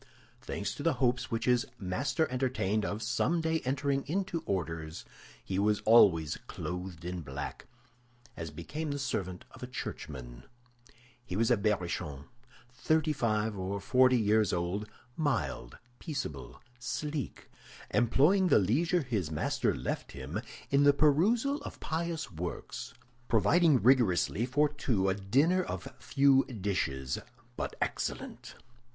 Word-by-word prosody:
Thanks 100 - -3
to - - -7
the 160 -1 +2
hopes 125 0 +1
which 115 -1 -2
his 125 +1 +3
master 135 - 0
entertained 115 -5 0
of 105 +2 -3
someday 160 +7 +1
entering 135 0 0
into 180 +1 -1
orders, 80 -4 -3 0.4
he 95 0 -2
was 105 +1 +2
always 85 -9 +5
clothed 90 -2 -6
in 90 0 -3
black, 70 -1 -6 0.7
as 80 -1 -5
became 150 - -5
the 145 - -2
servant 95 -10 -3
of - - -14
a 125 - -5
churchman. 65 - -7 0.8
He 90 - -5
was 115 +4 +2
a - - +7
Berrichon, 90 -8 -1 0.5
thirty 155 +4 +1
five 110 -5 0
or 95 +1 -3
forty 130 +4 +4
years 110 -2 +3
old, 90 +5 -2 0.3
mild, 125 - -1 0.2
peaceable, 70 - -5 0.2
sleek, 145 +2 -4 0.4
employing 150 - +4
the - - +6
leisure 150 - +2
his 105 - -1
master 80 -1 0
left - - -4
him - - -5 0.3
in 140 +1 +4
the 145 0 +6
perusal 195 - +3
of - - -8
pious 165 -4 -3
works, 85 +1 -6 0.3
providing 150 +5 +4
rigorously 120 -3 +3
for 145 +4 +3
two 125 -10 0
a - - +3
dinner 135 - +2
of - - -5
few 135 -1 +4
dishes, 90 - -2 0.4
but - - -4
excellent. - - -3
115 Hz, 130 wpm, -31 LUFS, 95-145 Hz, 0.8 s, a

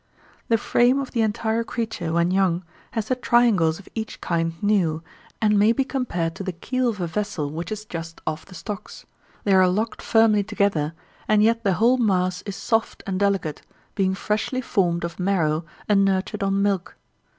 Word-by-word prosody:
The 230 - +3
frame 245 +4 +3
of 270 -2 -4
the 235 - 0
entire 220 +1 0
creature 225 -8 -3
when 170 +1 +2
young 185 -2 +2 0.3
has 225 -2 -2
the 255 - +2
triangles 230 -11 +3
of 200 - -14
each 220 -1 -5
kind 165 -1 -1
new, 175 -6 +1 0.4
and 210 -2 +3
may 210 +2 +5
be 270 - +1
compared 225 - -2
to - - -5
the 185 - -2
keel 255 +9 -1
of 210 -3 -4
a 175 - -1
vessel 170 -5 -3
which 165 +6 -5
is 215 0 -5
just 165 -4 -7
off 155 0 -3
the 185 - -14
stocks; 210 +2 -7 0.4
they 200 - +2
are 185 -1 +6
locked 215 +5 -1
firmly 225 -2 +4
together 195 -7 0 0.3
and 210 -1 +4
yet 230 +1 +2
the 195 -3 +2
whole 240 +7 +3
mass 185 -4 +1
is 200 - -4
soft 225 +1 -1
and 190 -3 -2
delicate, 195 -7 0 0.3
being 190 -2 +1
freshly 215 +6 -1
formed 180 -9 0
of 170 +1 -5
marrow 170 -4 +1 0.2
and 200 -2 +4
nurtured 195 +2 0
on 195 0 +1
milk. 195 -3 -1
200 Hz, 185 wpm, -23 LUFS, 175-220 Hz, 0.4 s, are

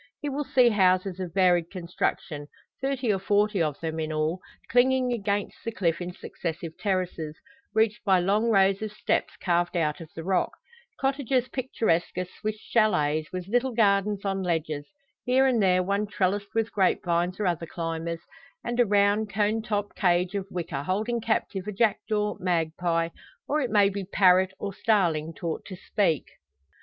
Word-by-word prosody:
He 295 - -3
will 285 +1 -2
see 250 -2 +5
houses 185 -2 +2
of 180 -2 -4
varied 175 -3 +3
construction 170 -4 -3 0.3
thirty 265 -5 0
or 195 - -1
forty 205 0 +2
of 150 -3 -1
them 160 -1 -3
in 155 0 -2
all 155 +3 -1 0.3
clinging 255 0 +3
against 205 -3 -2
the 230 - -3
cliff 175 -6 0
in 175 0 -4
successive 165 -2 -6
terraces, 180 -6 -2 0.4
reached 220 -1 +2
by 190 -3 +4
long 205 +6 +2
rows 195 -2 +4
of 215 -1 -3
steps 210 - -1
carved 175 0 0
out 155 -1 0
of 160 - -9
the 165 - -6
rock; 190 +1 +1 0.5
cottages 270 -2 +1
picturesque 225 -11 -1
as 180 0 -3
Swiss 215 0 -4
chalets, 155 -9 +1
with 185 -1 -5
little 245 +4 +1
gardens 205 -2 +2
on 195 -1 -1
ledges, 155 -5 -2 0.4
here 260 +1 +3
and 250 -4 +3
there 185 -1 +3
one 200 +3 0
trellised 200 0 0
with 225 0 0
grape 190 -2 +1
vines 175 +2 0
or 210 - 0
other 170 -2 -1
climbers, 165 0 -4 0.4
and 240 +1 -3
a 240 - +5
round 205 +1 +2
cone 215 +2 +1
topped 205 -2 -3
cage 180 0 +2
of 200 -1 -3
wicker 170 -6 -4
holding 215 +9 -1
captive 215 -3 -1
a - - -2
jackdaw, 210 0 0
magpie, 165 -1 0 0.4
or 300 +1 +1
it 255 - -1
may 205 -2 +5
be 200 0 -3
parrot 185 -1 +4
or 200 -1 -4
starling 175 -8 +1
taught 165 0 -4
to 190 - -8
speak. 175 - 0
195 Hz, 170 wpm, -27 LUFS, 175-215 Hz, 0.5 s, see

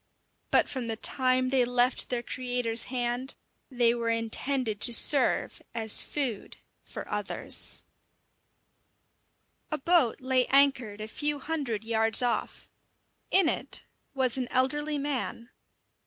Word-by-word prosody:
But - - +4
from 260 -4 -4
the 225 - -2
time 255 +2 0
they 260 -1 +3
left 245 +1 +3
their 245 -1 -2
Creator's 245 -2 0
hand 245 +1 -2 0.3
they 240 -3 +2
were 235 -1 -2
intended 230 0 -2
to 240 - +4
serve 275 +3 +2
as 220 -2 +3
food 255 -8 -3 0.3
for - - -8
others. - - -3 1.9
A 305 - -2
boat 315 -5 +2
lay 260 -1 +1
anchored 260 -7 +2
a 215 - -5
few 295 +6 -1
hundred 280 -8 -3
yards 225 +1 +2
off. 240 -1 -2 0.6
In 380 -3 +4
it - - -3 0.3
was 260 -2 +1
an 255 -2 -2
elderly 295 +4 0
man. 270 -4 -4
250 Hz, 125 wpm, -28 LUFS, 230-270 Hz, 1.9 s, But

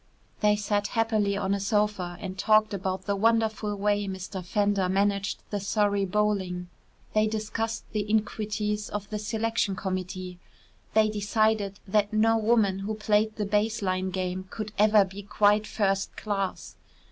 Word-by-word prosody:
They 210 0 +4
sat 205 0 0
happily 215 -3 +2
on 195 -1 0
a 200 - 0
sofa 200 -3 0
and 190 -2 -5
talked 215 +2 +3
about 190 -1 -2
the 200 - 0
wonderful 220 -1 +1
way 205 0 0
Mr. 190 0 -5
Fender 200 0 +1
managed 200 +1 0
the 205 - -1
Surrey 200 0 +1
bowling; 190 -3 -1 0.4
they 215 0 +3
discussed 220 +1 -3
the 210 -1 -2
iniquities 210 -1 -1
of 205 -1 -4
the 210 - -2
Selection 220 -1 -1
Committee; 185 -1 -4 0.6
they 220 0 +5
decided 210 -1 0
that 205 +1 +2
no 225 +1 +4
woman 215 -3 +2
who 210 +2 -3
played 215 0 +1
the 210 - -2
base 210 +2 0
line 185 0 0
game 185 0 -3
could 215 -1 -5
ever 210 -1 +6
be 195 +2 -9
quite 205 +1 +2
first 195 -2 -1
class. 195 -3 -3
205 Hz, 150 wpm, -27 LUFS, 195-215 Hz, 0.6 s, ever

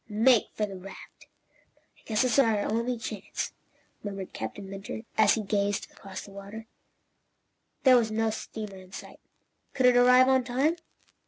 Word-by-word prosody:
"Make 225 +2 +4
for 215 - 0
the 195 -2 -8
raft!" 195 +2 -12 0.7
"I - - -25
guess 215 0 +2
it's 255 +1 +2
our 225 -6 +3
only 235 +4 -1
chance," 215 -3 -5 0.5
murmured 195 -2 -6
Captain 200 -1 -6
Mentor, 195 +3 -7
as 215 -2 +5
he 220 - -3
gazed 200 0 -1
across 190 -1 -9
the 200 - -12
water. 200 +3 -9 1.2
There 255 -2 +7
was 230 -2 +1
no 220 0 0
steamer 215 -2 -7
in 185 0 -15
sight. - - -10 0.6
Could 260 - +2
it 250 0 +6
arrive 250 +1 +6
on 260 -1 +4
time? 270 +7 +1
220 Hz, 160 wpm, -28 LUFS, 200-245 Hz, 1.2 s, There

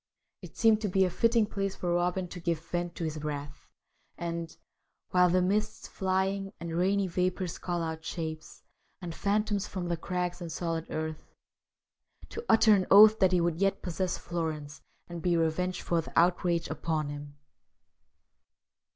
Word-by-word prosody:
It - - -12
seemed 220 -2 +4
to 215 - 0
be 190 0 +3
a 180 - -1
fitting 230 +3 +3
place 195 -2 -3
for 175 -1 -1
Robin 180 +1 0
to 180 - -8
give 170 -2 -1
vent 175 0 -3
to - - -5
his 155 -1 -4
wrath, 145 -1 -6 0.5
and, 170 -1 -5 0.5
While 180 -1 +5
the 180 +1 +3
mists 210 +3 -1
Flying, 195 0 -1
and 165 0 -5
rainy 195 +3 +2
vapours, 180 0 -2
call 175 -2 -2
out 160 0 -4
shapes 160 -2 -6 0.4
And 175 -3 -6
phantoms 205 +1 0
from 180 -3 -4
the 170 - 0
crags 180 +1 -3
and 170 -2 -5
solid 165 0 -3
earth, 155 0 -5 0.9
to 460 - -6
utter 220 -1 +6
an 190 -2 +2
oath 215 +2 +8
that 190 -1 +4
he 180 - +3
would 170 +1 -1
yet 195 0 +1
possess 180 +1 -2
Florence 155 -4 -4 0.3
and 170 -1 -7
be 175 0 +2
revenged 165 +3 0
for 170 -1 +1
the 160 - -1
outrage 175 -1 +2
upon 155 -3 -2
him. 145 0 -8
175 Hz, 165 wpm, -29 LUFS, 165-190 Hz, 0.9 s, oath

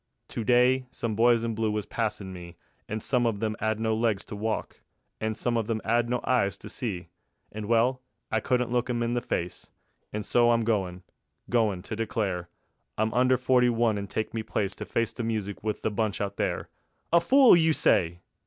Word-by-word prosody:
To 115 - -3
day 125 +2 +3
some 115 -3 -3
boys 115 +1 +4
in 115 -1 -1
blue 110 0 0
was 105 -1 -2
passin' 105 -4 -3
me, 85 -1 -10 0.3
And 110 0 -3
some 125 -3 +2
of 115 - 0
'em 110 -1 0
they 110 - -1
'ad 110 0 0
no 110 0 +1
legs 110 -3 0
to - - -7
walk, 110 +1 -3 0.4
And 110 0 -2
some 120 -1 0
of 115 -1 -2
'em 110 -1 0
they 110 - -2
'ad 120 0 +2
no 125 0 0
eyes 100 -6 +1
to - - -10
see. 95 -10 -4 0.4
And 105 -1 -6
well, 120 +3 +2 0.3
I 110 - +2
couldn't 125 +1 0
look 125 +1 0
'em 120 -1 0
in 120 0 -1
the 120 - 0
face, 85 -5 -4 0.4
And 105 -1 -4
so 120 -1 +4
I'm 115 0 +2
goin', 95 -5 -1 0.5
goin' 105 -7 +1
to - - -5
declare 100 -6 -2 0.5
I'm 110 0 0
under 125 +2 +4
forty 125 -1 +3
one 115 -3 +1
and 100 0 -6
take 110 +2 -3
me 115 - -2
place 100 -3 -2
To - - -5
face 115 -1 -1
the 120 - -5
music 110 -4 -3
with 110 -1 -3
the 110 - 0
bunch 105 -1 -1
out 100 -1 -3
there. - - -2 0.4
A 170 - +6
fool, 260 +3 +7
you 165 -1 +4
say! 85 - +2
110 Hz, 215 wpm, -27 LUFS, 105-120 Hz, 0.5 s, fool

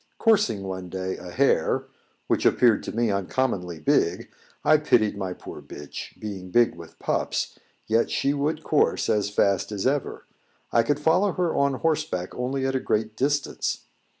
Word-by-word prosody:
Coursing 210 - +2
one 95 -1 -5
day 95 +1 -3
a 90 - -9
hare, 135 +3 +2 0.4
which - - 0
appeared 120 -4 +4
to - - -5
me 115 -1 +1
uncommonly 100 -3 -1
big, 75 - +1 0.3
I 155 - +6
pitied 110 -9 +2
my 95 -2 -3
poor - - -10
bitch, 75 -1 -9
being 95 -4 -6
big 120 +4 +4
with - - -12
pups, - - -2 0.3
yet 115 +1 +2
she 140 - +1
would 150 +2 -1
course 150 - +2
as 105 -2 +1
fast 100 -1 +1
as 100 -2 -3
ever. 140 +1 -1 0.5
I 115 - +5
could 145 +5 0
follow 180 +6 +3
her 175 -2 0
on 140 -1 +2
horseback 150 - -1
only 130 +2 -2
at 135 - 0
a 130 - +1
great 110 -2 -1
distance. 140 +4 -1
120 Hz, 165 wpm, -25 LUFS, 100-145 Hz, 0.5 s, I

